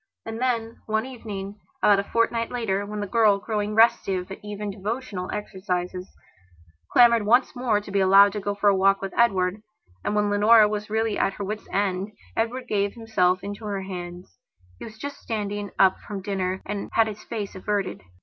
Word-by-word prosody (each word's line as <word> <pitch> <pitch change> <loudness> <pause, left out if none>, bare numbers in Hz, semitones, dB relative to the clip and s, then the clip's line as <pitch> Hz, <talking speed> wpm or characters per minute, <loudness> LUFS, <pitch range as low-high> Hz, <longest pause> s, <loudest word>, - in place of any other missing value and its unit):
And 225 +1 -6
then, 230 -3 -1
one 220 +1 0
evening, 210 -5 -7 0.2
about 205 -1 +6
a - - 0
fortnight 230 +1 0
later, 205 -5 -2
when 210 0 -4
the - - -2
girl, 210 0 +3
growing 210 0 -3
restive 195 -5 +3
at 195 - -9
even 210 0 -5
devotional 200 -1 -4
exercises, 185 -3 -4 0.8
clamoured 235 -2 +6
once 245 +6 +3
more 245 -4 +1
to 205 -1 -10
be 200 - +1
allowed 195 +1 +6
to 210 - -3
go 205 0 -3
for 205 - 0
a 200 - +6
walk 195 +1 +3
with 195 -1 -5
Edward, 195 -4 +2 0.4
and 210 - -1
when 210 -1 +1
Leonora 210 +1 +6
was 210 0 -4
really 220 -1 0
at 195 - +1
her 200 - -6
wits' 210 +2 -5
end, 195 +1 -1 0.2
Edward 245 +3 -2
gave 200 -2 0
himself 200 -5 +1
into 205 +2 -6
her 200 -2 -3
hands. 175 - -8 0.4
He - - -7
was 220 -1 -11
just 285 +4 -7
standing 205 -2 -4
up 190 -1 +4
from 200 -2 -7
dinner 190 -1 -2
and 205 0 -4
had 225 - +4
his 215 -1 -6
face 210 -4 -5
averted. 200 +1 -2
205 Hz, 190 wpm, -25 LUFS, 195-225 Hz, 0.8 s, about